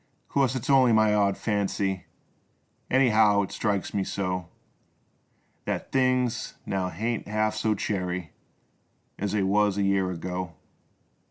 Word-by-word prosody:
Course 135 Hz, -2 st, +1 dB
its 125 Hz, -, -4 dB
only 130 Hz, -4 st, +5 dB
my 110 Hz, -1 st, +4 dB
odd 100 Hz, -2 st, +2 dB
fancy 100 Hz, -3 st, -1 dB, 0.8 s
Anyhow 110 Hz, -6 st, +4 dB
it 95 Hz, -, -6 dB
strikes 100 Hz, -3 st, -1 dB
me 100 Hz, -, 0 dB
so, 90 Hz, -3 st, -3 dB, 1.2 s
Thet -, -, -3 dB
things 130 Hz, -2 st, +1 dB
now 95 Hz, -2 st, -1 dB
haint 115 Hz, +4 st, -3 dB
half 110 Hz, +1 st, 0 dB
so 110 Hz, 0 st, 0 dB
cheery 90 Hz, -5 st, -3 dB, 0.9 s
As 100 Hz, 0 st, -2 dB
they 105 Hz, -2 st, +1 dB
was 100 Hz, +1 st, +2 dB
a 100 Hz, -, +1 dB
year 95 Hz, -1 st, +2 dB
ago. 90 Hz, -1 st, -5 dB
105 Hz, 125 wpm, -26 LUFS, 95-110 Hz, 1.2 s, only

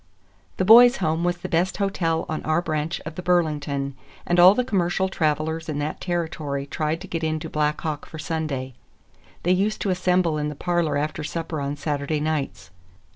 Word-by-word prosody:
The 185 Hz, -, +1 dB
Boys' 245 Hz, +5 st, +8 dB
Home 160 Hz, -3 st, 0 dB
was 175 Hz, 0 st, 0 dB
the -, -, -6 dB
best 175 Hz, +3 st, 0 dB
hotel 185 Hz, -5 st, 0 dB
on 155 Hz, -, -3 dB
our 155 Hz, +2 st, +2 dB
branch 155 Hz, -1 st, -2 dB
of 155 Hz, -, -7 dB
the 180 Hz, -, -6 dB
Burlington, 150 Hz, -6 st, 0 dB, 0.3 s
and 175 Hz, 0 st, +2 dB
all 185 Hz, +3 st, +9 dB
the 250 Hz, -, +1 dB
commercial 190 Hz, -3 st, 0 dB
travelers 160 Hz, -1 st, -1 dB
in 150 Hz, -, -2 dB
that 145 Hz, +1 st, -3 dB
territory 160 Hz, -5 st, -2 dB
tried 155 Hz, +3 st, -2 dB
to 190 Hz, -, -8 dB
get 165 Hz, -2 st, -4 dB
into 155 Hz, -1 st, -2 dB
Black 150 Hz, 0 st, 0 dB
Hawk 155 Hz, -3 st, -4 dB
for 160 Hz, -, -9 dB
Sunday. 155 Hz, -5 st, -3 dB, 0.7 s
They 175 Hz, -, +2 dB
used 200 Hz, +4 st, 0 dB
to 195 Hz, -, 0 dB
assemble 180 Hz, -3 st, +1 dB
in 150 Hz, 0 st, -1 dB
the 150 Hz, -, -6 dB
parlor 170 Hz, -2 st, 0 dB
after 150 Hz, +1 st, -2 dB
supper 160 Hz, -1 st, -4 dB
on 140 Hz, +1 st, -2 dB
Saturday 145 Hz, 0 st, -2 dB
nights. 135 Hz, -12 st, -3 dB
160 Hz, 185 wpm, -24 LUFS, 150-175 Hz, 0.7 s, all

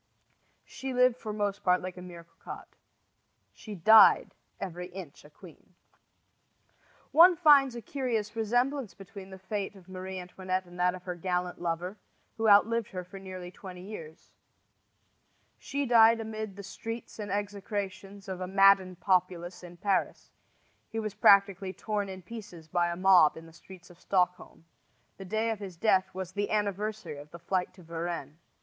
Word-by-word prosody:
She 265 Hz, -1 st, -6 dB
lived 250 Hz, -1 st, +4 dB
for 220 Hz, -3 st, -6 dB
most 205 Hz, -1 st, -2 dB
part 180 Hz, 0 st, +3 dB
like 185 Hz, 0 st, -6 dB
a 180 Hz, -, -9 dB
mere 175 Hz, -2 st, -10 dB
cocotte. 165 Hz, 0 st, -12 dB, 0.8 s
She 215 Hz, -2 st, -9 dB
died 220 Hz, +5 st, +6 dB, 0.3 s
every 180 Hz, -1 st, -5 dB
inch 180 Hz, -5 st, -10 dB
a 150 Hz, -, -15 dB
queen. 175 Hz, +2 st, -17 dB, 1.4 s
One 345 Hz, +3 st, +8 dB
finds 285 Hz, -6 st, +5 dB
a 235 Hz, -, -7 dB
curious 230 Hz, -5 st, -2 dB
resemblance 245 Hz, +3 st, 0 dB
between 195 Hz, 0 st, -11 dB
the 190 Hz, -, -10 dB
fate 200 Hz, +1 st, -4 dB
of 190 Hz, -2 st, -16 dB
Marie 185 Hz, 0 st, -7 dB
Antoinette 185 Hz, +1 st, -4 dB
and 175 Hz, 0 st, -13 dB
that 180 Hz, 0 st, +2 dB
of 180 Hz, -, -11 dB
her 180 Hz, -, -4 dB
gallant 180 Hz, 0 st, -3 dB
lover, 175 Hz, +4 st, -3 dB, 0.4 s
who 225 Hz, -1 st, +2 dB
outlived 220 Hz, +2 st, +4 dB
her 185 Hz, -2 st, -5 dB
for 195 Hz, +2 st, -11 dB
nearly 185 Hz, -2 st, -8 dB
twenty 180 Hz, -1 st, -10 dB
years. 165 Hz, -6 st, -10 dB, 1.3 s
She 280 Hz, 0 st, -3 dB
died 230 Hz, -2 st, +6 dB
amid 220 Hz, -2 st, -5 dB
the 200 Hz, -, -9 dB
shrieks 225 Hz, +4 st, -7 dB
and 205 Hz, -1 st, -5 dB
execrations 200 Hz, 0 st, -4 dB
of 185 Hz, -1 st, -5 dB
a 185 Hz, -, -3 dB
maddened 190 Hz, -2 st, +4 dB
populace 180 Hz, -2 st, 0 dB
in 175 Hz, -1 st, -12 dB
Paris; 195 Hz, +2 st, -1 dB, 0.6 s
he 225 Hz, -, -6 dB
was 215 Hz, -2 st, -3 dB
practically 200 Hz, -2 st, +4 dB
torn 205 Hz, -2 st, -3 dB
in 190 Hz, -1 st, -8 dB
pieces 185 Hz, -6 st, -10 dB
by 175 Hz, +1 st, +1 dB
a 170 Hz, -, -3 dB
mob 185 Hz, -5 st, +5 dB
in 165 Hz, -, -10 dB
the 165 Hz, -, -15 dB
streets 180 Hz, +1 st, -14 dB
of 175 Hz, -, -18 dB
Stockholm. 180 Hz, -3 st, -1 dB, 0.5 s
The 195 Hz, -, -9 dB
day 220 Hz, +4 st, 0 dB
of 220 Hz, -, -4 dB
his 190 Hz, -4 st, -8 dB
death 190 Hz, -1 st, +2 dB
was 185 Hz, -1 st, -6 dB
the 205 Hz, +2 st, -2 dB
anniversary 205 Hz, -5 st, -2 dB
of 145 Hz, +1 st, -12 dB
the 170 Hz, -, -10 dB
flight 180 Hz, +1 st, -2 dB
to 180 Hz, -, -15 dB
Varennes. 165 Hz, -2 st, -5 dB
190 Hz, 165 wpm, -29 LUFS, 180-215 Hz, 1.4 s, One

